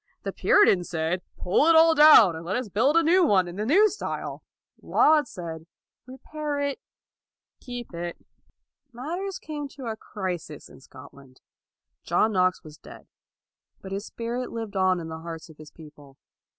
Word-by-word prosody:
The - - -4
Puritans 185 - +3
said, 170 +2 -2
" - - -40
Pull 190 - +2
it 330 - +5
all 325 0 +6
down, 295 - +7
and 160 - -8
let 175 - -3
us 250 -3 -3
build 245 - +1
a 335 - +4
new 355 +3 +4
one 195 - +3
in 175 - -8
the 210 +1 -3
new 395 - +5
style.' 420 - -6 0.4
1 - - -16
Laud 305 -1 +4
said, 165 -2 -8 0.2
" - - -68
Repair 290 +3 -6
it, 285 -1 -2 0.8
keep 245 -5 -8
it.' 170 0 -5 0.8
1 - - -23
Matters 375 +4 -4
came 295 -2 -6
to 275 -1 -11
a 225 -1 -3
crisis 180 -8 -7
in - - -16
Scotland. 135 -1 -16 0.6
John 220 - +1
Knox 185 -2 +1
was 155 -2 -14
dead, - - -14 0.7
but 190 - -11
his 200 +2 -5
spirit 240 +2 -5
lived 225 -3 -6
in 185 -3 +1
the 160 0 -7
hearts 165 0 -9
of 155 - -16
his 155 -1 -13
people. 145 -4 -16
205 Hz, 175 wpm, -25 LUFS, -, 0.8 s, down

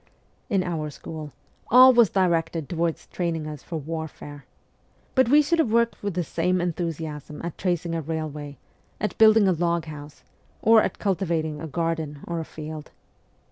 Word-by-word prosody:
In 195 -5 +2
our 160 -4 -3
school 150 +1 -8 0.4
all 255 +2 +9
was 235 -5 +5
directed 165 -4 0
towards 170 -2 -2
training 165 -3 -3
us 150 -3 -7
for 170 - -7
warfare. 155 -2 -7 0.7
But 260 -3 +3
we 295 +3 +6
should 335 +3 +1
have 255 -9 +2
worked 235 0 +2
with 200 -3 -3
the 180 - 0
same 180 +3 0
enthusiasm 160 -4 -4
at 170 -2 -4
tracing 175 -2 -1
a 165 - -1
railway, 150 -2 -5 0.4
at 210 - -2
building 220 -2 +7
a - - +4
log 170 -1 0
house, 150 -1 -10 0.4
or 225 0 +6
at - - -2
cultivating 165 -6 -1
a 165 - -5
garden 160 -2 -2
or 170 -1 -3
a 160 - -4
field. 155 -1 -8
165 Hz, 165 wpm, -25 LUFS, 155-185 Hz, 0.7 s, all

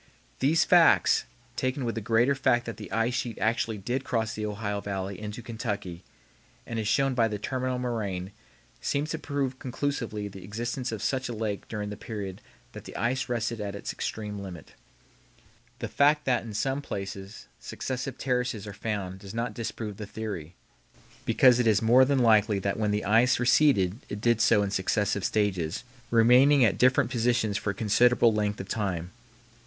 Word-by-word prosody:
These 155 +5 +3
facts, 175 -2 +5 0.3
taken 130 0 -1
with 115 - -1
the 115 - -4
greater 115 +5 +3
fact 120 -3 +2
that 115 -3 -6
the - - -9
ice 115 +2 +1
sheet 120 -2 -3
actually 110 0 0
did 120 +7 -2
cross 115 -3 -1
the 105 -1 -3
Ohio 105 -1 -3
Valley 100 -1 -4
into 105 +2 -6
Kentucky, 105 -7 -4 0.6
as 115 - -4
is 110 - -2
shown 135 +4 +2
by 115 -2 +3
the 105 -1 -3
terminal 130 +3 -2
moraine, 105 -7 -3 0.5
seems 145 +3 -1
to 160 - -3
prove 135 -4 -2
conclusively 125 -6 -3
the 95 -2 -10
existence 120 +6 -4
of 110 -3 -5
such 130 -1 -1
a - - -3
lake 105 -2 -3
during 105 -2 -4
the 105 - -6
period 100 -5 -6 0.3
that - - -10
the - - -10
ice 125 +5 -1
rested 115 -2 -2
at 100 -1 -4
its 100 - -5
extreme 105 -2 -4
limit. 90 -7 -9 1.0
The - - -4
fact 150 +1 +3
that 125 -2 +2
in 110 -3 -8
some 135 +6 -1
places 100 -4 -7
successive 130 0 -5
terraces 125 -5 -1
are 105 - -7
found 100 -3 -4
does 100 +2 -10
not 115 -1 -2
disprove 110 -2 -5
the 105 - -6
theory, 100 -7 -6 0.7
because 125 -2 +5
it 120 - +2
is 105 -3 +4
more 120 +4 +6
than 140 +1 +1
likely 110 -4 +4
that 100 +2 -2
when 105 -1 +1
the 105 0 -1
ice 115 +4 +4
receded 120 -6 +3
it 105 - -4
did 120 0 +2
so 105 -3 +4
in 100 - -2
successive 100 +1 0
stages, 95 -6 0 0.3
remaining 125 +4 +6
at 95 -4 +1
different 130 0 +4
positions 120 -3 +1
for 100 - -2
a - - 0
considerable 115 +2 +4
length 105 -1 -1
of 95 - -6
time. 95 -5 -2
110 Hz, 180 wpm, -27 LUFS, 100-125 Hz, 1.0 s, more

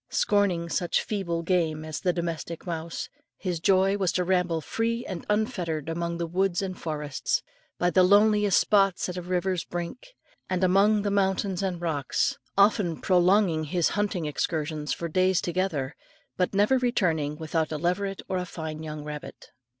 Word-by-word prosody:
Scorning 195 -5 +1
such 175 +1 0
feeble 170 -5 -2
game 165 -3 0
as 155 -1 -4
the 180 - +1
domestic 170 -1 -4
mouse, 165 -1 -4 0.3
his 180 -4 -3
joy 195 +3 +3
was 190 -4 +1
to 180 - +1
ramble 180 -2 +1
free 230 +8 -2
and 185 -3 -6
unfettered 185 - -1
among 170 +1 -2
the 170 - -2
woods 185 +2 0
and 185 -1 -3
forests, 155 - -2 0.3
by 175 0 +1
the 185 - +5
loneliest 205 +1 +5
spots 195 -3 +2
at - - -3
the 180 - -4
river's 180 0 -1
brink, 175 - -6 0.3
and 185 0 0
among 200 +3 +4
the 205 - 0
mountains 195 -1 +1
and 185 -3 -2
rocks; 150 -6 0 0.2
often 200 -5 +3
prolonging 180 -3 +3
his 170 +2 +1
hunting 205 -5 -1
excursions 150 -1 -2
for 170 - -2
days 185 +2 +2
together, 170 -6 -2 0.4
but 180 +1 0
never 210 +6 +4
returning 165 -12 +1
without 160 0 -1
a 155 - -2
leveret 190 +4 -1
or 185 -1 -1
fine 160 -3 -6
young 155 -1 -6
rabbit. 150 0 -8
180 Hz, 160 wpm, -27 LUFS, 165-195 Hz, 0.4 s, the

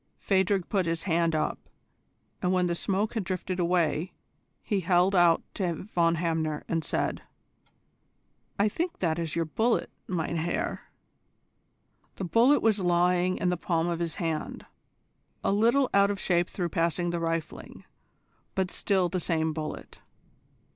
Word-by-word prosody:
Phadrig 190 -1 +1
put 190 -4 0
his 165 0 -2
hand 165 -2 +1
up, 155 0 -1 0.8
and 180 - +1
when 185 -1 +2
the 175 - 0
smoke 195 +4 -1
had 220 -4 -1
drifted 185 0 -3
away, 170 -1 +1 0.5
he 205 -3 0
held 180 +1 +3
it 185 - +5
out 170 -1 +4
to 180 -4 -1
Von 170 -4 +1
Hamner, 160 -2 -1
and 165 -1 -1
said: - - -2 1.4
"I 200 - +3
think 340 - -2
that 165 -2 0
is 165 -2 -3
your 165 -1 0
bullet, 225 +9 0 0.2
mein 170 -2 -2
Herr." 165 +2 -3 1.3
The - - -5
bullet 235 - +4
was 215 -2 +3
lying 180 0 +2
in 180 - 0
the 180 - 0
palm 170 -1 0
of 170 -1 -2
his 170 -2 -2
hand, 165 -4 -3 0.8
a - - +2
little 235 +7 +3
out 200 0 +5
of 200 -1 -2
shape 175 -2 +1
through 175 -3 -3
passing 170 +1 0
the 170 - -2
rifling, 165 -1 -4 0.7
but 190 -1 0
still 190 -3 +1
the 180 +1 -2
same 160 -2 0
bullet. 155 -1 -6
175 Hz, 155 wpm, -28 LUFS, 165-190 Hz, 1.4 s, it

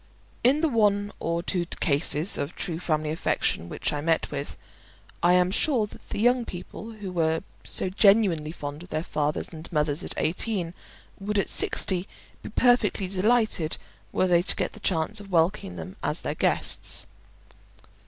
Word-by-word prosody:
In 275 +5 +4
the 325 - +3
one 205 -5 +1
or 170 +1 -2
two 180 -1 0
cases 150 +2 +3
of 145 - -3
true 165 -3 -3
family 155 -3 -1
affection 85 - -1
which - - -2
I 145 - -3
met 165 +1 0
with, 140 0 -5 0.6
I 175 +1 +4
am 180 0 +3
sure 240 +1 +2
that 210 - -15
the - - -4
young 245 +2 +3
people 220 +3 -8
who 205 -4 -7
were 160 -1 0 0.2
so - - 0
genuinely 190 -5 +3
fond 145 -2 -7
of 180 - -12
their 155 +1 -2
fathers 150 -2 -2
and 160 +1 -9
mothers 150 +1 0
at - - -5
eighteen, 180 0 -1 0.5
would 205 +1 -2
at 200 - +1
sixty 185 0 +3 0.3
be - - -8
perfectly 225 -4 +2
delighted 200 -4 +1 0.3
were - - +1
they 175 -2 +4
to 180 - -1
get - - -2
the - - -11
chance 190 +2 -1
of 200 -1 -11
welcoming 165 - +1
them 85 +2 -8
as - - -1
their - - -2
guests. - - +2
180 Hz, 170 wpm, -26 LUFS, 160-205 Hz, 0.6 s, In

